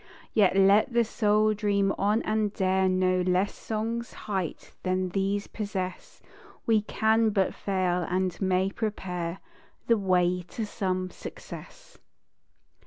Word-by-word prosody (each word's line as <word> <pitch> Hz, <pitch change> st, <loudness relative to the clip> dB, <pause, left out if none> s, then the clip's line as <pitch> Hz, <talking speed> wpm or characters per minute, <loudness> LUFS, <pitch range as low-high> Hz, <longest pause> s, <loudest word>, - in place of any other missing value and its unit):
_ -, -, -25 dB, 0.3 s
Yet 200 Hz, -3 st, +4 dB
let 200 Hz, +6 st, +5 dB
the 235 Hz, 0 st, +4 dB
Soul 215 Hz, -1 st, +2 dB
dream 200 Hz, -2 st, +1 dB
on 210 Hz, +3 st, +1 dB
and 215 Hz, -1 st, 0 dB
dare 190 Hz, -1 st, +1 dB
No 185 Hz, 0 st, +2 dB
less 185 Hz, +2 st, +1 dB
SONG'S 230 Hz, +2 st, -4 dB
_height 190 Hz, -6 st, -3 dB
that 185 Hz, -1 st, -1 dB
these 200 Hz, +1 st, 0 dB
possess: 195 Hz, -4 st, -5 dB, 0.4 s
We 220 Hz, -2 st, +3 dB
can 220 Hz, +1 st, +2 dB
but 195 Hz, -3 st, +1 dB
fail; 180 Hz, -3 st, -1 dB
and 185 Hz, 0 st, -1 dB
may 190 Hz, 0 st, +1 dB
prepare 185 Hz, -5 st, -4 dB, 0.4 s
The 230 Hz, -2 st, +3 dB
way 180 Hz, -2 st, +2 dB
to 225 Hz, -, -3 dB
some 185 Hz, -3 st, -2 dB
success. -, -, -11 dB
195 Hz, 130 wpm, -27 LUFS, 185-215 Hz, 0.4 s, let